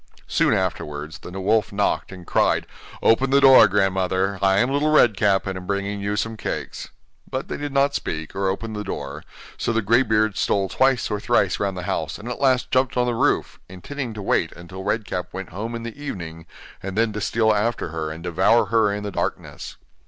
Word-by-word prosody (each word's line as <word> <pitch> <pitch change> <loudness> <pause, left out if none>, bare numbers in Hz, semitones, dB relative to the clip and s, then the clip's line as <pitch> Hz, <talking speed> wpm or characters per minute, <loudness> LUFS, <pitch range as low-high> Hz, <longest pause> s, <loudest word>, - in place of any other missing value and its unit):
Soon - - +2
afterwards 75 +3 -3
the - - -10
wolf 105 +2 +1
knocked, 100 0 0
and 90 -2 -10
cried: - - +2 0.4
'Open 130 +4 +4
the 140 +1 +5
door, 135 -5 +8
grandmother, 95 0 0
I 95 0 +3
am 125 +6 +2
Little 145 +2 +1
Red 125 -8 +5
Cap, 100 0 +2
and 95 -1 -3
am 90 -1 -8
bringing 100 0 -2
you 100 +1 -1
some 115 +1 -2
cakes.' - - -5 0.4
But - - -4
they - - -3
did 145 0 -4
not 140 +1 +2
speak, 80 +2 -4
or 95 0 0
open 110 +4 -4
the 105 0 -4
door, 70 -5 -6 0.4
so - - 0
the 115 -1 0
grey 115 +5 +4
beard 110 -4 +1
stole 95 -1 +1
twice 130 +2 +2
or 105 - -1
thrice - - +1
round 100 -2 -1
the 90 - -5
house, 90 -6 -2
and 105 - -10
at 125 - -5
last 130 -2 +2
jumped 130 -1 +1
on 125 - +3
the 120 - 0
roof, 115 - 0
intending 115 +6 -6
to 105 - -6
wait - - +1
until 90 +2 -9
Red 105 +2 -1
Cap 90 -2 -3
went 95 -1 -6
home 110 +6 -5
in 115 - -5
the 115 -1 -6
evening, 80 - -6 0.3
and 95 +1 -5
then 115 -1 +2
to 105 - -4
steal 110 +2 +2
after 105 -3 -1
her 80 -1 -4
and 80 +2 -8
devour 90 +7 +3
her 110 -3 +4
in 105 0 -3
the 100 - -4
darkness. - - -4
105 Hz, 215 wpm, -23 LUFS, 95-115 Hz, 0.4 s, door